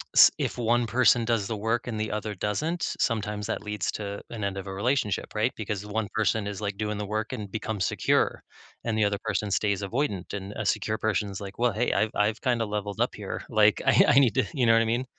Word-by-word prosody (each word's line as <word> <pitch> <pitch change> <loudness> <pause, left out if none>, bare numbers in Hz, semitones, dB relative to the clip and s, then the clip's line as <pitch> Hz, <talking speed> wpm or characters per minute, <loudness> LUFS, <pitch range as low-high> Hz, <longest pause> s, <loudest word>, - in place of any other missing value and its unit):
s - - +10
if - - -2
one 120 0 +2
person 120 +1 +4
does 115 -4 0
the 110 - -2
work 115 +3 -1
and 115 -3 -3
the 110 - -2
other 105 0 -3
doesn't, 155 - -2 0.2
sometimes 105 -2 -1
that - - -3
leads 105 -4 -2
to 100 -1 -5
an 110 -3 -5
end 100 -1 -2
of 95 0 -6
a 95 - -5
relationship, 105 +1 -1
right? - - +1
Because 105 -1 -4
one 105 0 -2
person 110 -1 +1
is, 100 -1 -5
like, 100 -1 -2
doing 105 0 -2
the 105 - -2
work 110 +3 -3
and 105 -6 -6
becomes 110 -3 -2
secure, - - +1 0.4
and, 115 -2 -1
the 110 - +3
other 100 -1 0
person 105 -1 -1
stays 100 0 +1
avoidant, 100 -4 -2
and 100 0 -5
a 110 - -3
secure 110 +1 0
person 105 -2 0
is 95 - -6
like, 100 +1 -8
"Well, 120 0 +3
hey, 115 +4 0
I've 110 +2 +1
I've 105 +2 +1
kinda 120 -4 +1
leveled 105 -1 -4
up - - +1
here. - - -5
Like, - - +4
I - - +5
I 140 - +6
need 120 -7 +4
to" - - +3
you 125 -4 +2
know 115 - +6
what 115 - +5
I - - -1
mean? 120 +3 0
105 Hz, 245 wpm, -27 LUFS, 100-115 Hz, 0.4 s, s